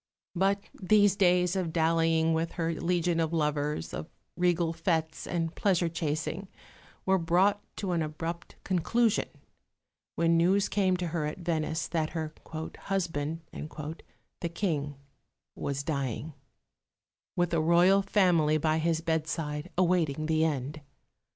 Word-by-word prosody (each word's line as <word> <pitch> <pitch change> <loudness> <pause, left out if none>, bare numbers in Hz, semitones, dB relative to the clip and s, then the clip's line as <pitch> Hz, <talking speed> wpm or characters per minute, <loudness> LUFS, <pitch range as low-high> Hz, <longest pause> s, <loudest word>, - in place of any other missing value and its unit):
'" - - -67
But 200 0 +1 0.2
these 205 +1 +4
days 180 -2 +3
of 180 -4 -1
dallying 165 0 +2
with 160 +1 -1
her 165 -1 -1
legion 175 0 0
of 160 -1 +1
lovers, 150 - -1
of 75 - -5 0.3
regal 175 -2 +1
fêtes 160 -1 -1
and 165 -1 -1
pleasure 180 -4 +1
chasing, 160 +3 -3 0.6
were 190 0 +3
brought 185 +5 +3
to 195 -3 -3
an 170 -2 +1
abrupt 165 +2 -5
conclusion 210 +5 +1 0.9
when 165 0 +3
news 190 +4 +3
came 190 -3 +2
to 175 -1 -2
her 155 -2 -1
at 150 - -5
Venice 160 -2 -1
that 160 -2 -1
her 155 -1 -3 0.5
"husband," 165 -5 -2 1.0
the 170 - -2
King, 150 -6 -1 0.6
was 140 0 -3
dying, 140 0 -3 1.0
with 175 -1 +1
the 165 -2 +2
Royal 175 +4 +5
family 175 -6 +3
by 155 +1 +1
his 160 0 +1
bedside 160 -1 -2
awaiting 170 -5 +2
the 160 0 +2
end. 150 -1 -2
165 Hz, 130 wpm, -29 LUFS, 155-180 Hz, 1.0 s, Royal